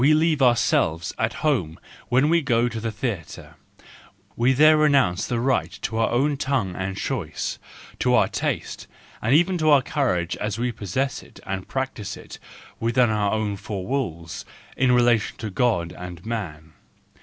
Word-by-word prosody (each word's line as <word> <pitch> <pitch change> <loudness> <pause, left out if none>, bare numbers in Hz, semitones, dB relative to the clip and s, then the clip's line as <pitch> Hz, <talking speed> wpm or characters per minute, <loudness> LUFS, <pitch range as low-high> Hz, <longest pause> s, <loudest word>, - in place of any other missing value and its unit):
We 150 +3 +6
leave 155 -2 +2
ourselves 115 -10 +2
at - - +1
home 90 - 0 0.3
when 130 +4 +3
we 170 0 +4
go 120 -3 +2
to 115 -2 -4
the 115 0 -3
theatre; 105 - -5 0.8
we 120 +3 +3
there 155 +4 +6
renounce 140 -12 +3
the 120 -2 -1
right 130 +1 +1
to 110 - -2
our 115 - +2
own 140 +4 +1
tongue 130 -11 -1
and 95 +1 -4
choice, 100 - -3 0.4
to - - +3
our - - +4
taste, - - -3 0.3
and 120 +6 +3
even 175 +3 +3
to 155 -1 +2
our 140 -3 +6
courage 95 - 0
as 105 0 -3
we 120 +1 -1
possess 115 +5 -2
it - - -16
and 95 -1 -4
practise 130 -7 -4
it - - -11 0.4
within 120 0 +2
our 105 -2 +1
own 110 -2 -1
four 100 -2 -5
walls 85 - -3 0.3
in 130 -1 +3
relation 120 -3 +3
to 110 -2 -5
God 95 -6 +1
and 90 0 -9
man. 80 -9 -5
115 Hz, 165 wpm, -23 LUFS, 95-135 Hz, 0.8 s, We